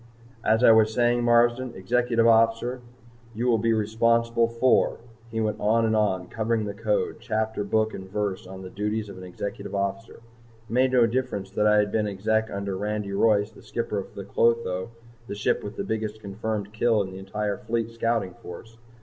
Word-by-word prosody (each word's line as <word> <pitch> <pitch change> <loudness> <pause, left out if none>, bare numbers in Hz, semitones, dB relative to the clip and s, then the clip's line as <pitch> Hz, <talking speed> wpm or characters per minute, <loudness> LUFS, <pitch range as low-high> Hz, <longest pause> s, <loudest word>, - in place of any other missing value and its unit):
"As 110 +2 +3
I 115 - +8
was 110 -1 +5
saying, 120 +1 +2
Marsden, 120 +1 +3
Executive 120 +3 +1
Officer, 115 +2 +3 0.5
you 115 +3 -2
will 120 -3 +3
be 115 +2 +1
responsible 115 +2 +2
for 115 +2 +2 0.2
" 115 +1 -26
He 115 0 -3
went 110 -1 -1
on 115 +2 +2
and 110 0 +1
on, 95 -4 +1
covering 110 +1 -1
the 100 - -4
Code 105 0 -1
chapter, 110 -1 -2
book 110 +2 0
and 95 0 -8
verse 100 -2 -3
on 95 0 -9
the 90 - -9
duties 105 +2 -2
of 95 -2 -9
an - - -9
Executive 100 +2 -6
Officer. 100 +3 -3
It - - -17 0.5
made 130 +1 +3
no 125 -2 +6
difference 110 -5 -2
that 105 +2 +1
I 105 0 +5
had 105 0 +2
been 110 -1 0
Exec 110 +3 0
under 100 -1 -4
Andy 105 -1 -2
Royce, 105 0 +2
the 110 - -16
skipper 115 -3 -3
of 95 - -9
the 100 - -6
"Clotho," 100 -2 +1 0.4
the - - -5
ship 105 - 0
with 105 +2 -6
the - - -3
biggest 110 -1 -3
confirmed 105 0 -4
kill 110 -2 +2
in 95 - -7
the 95 - -8
entire 100 +1 -3
Fleet 115 0 -2
Scouting 115 -5 -1
Force. 115 +6 -11
110 Hz, 195 wpm, -25 LUFS, 100-115 Hz, 0.5 s, I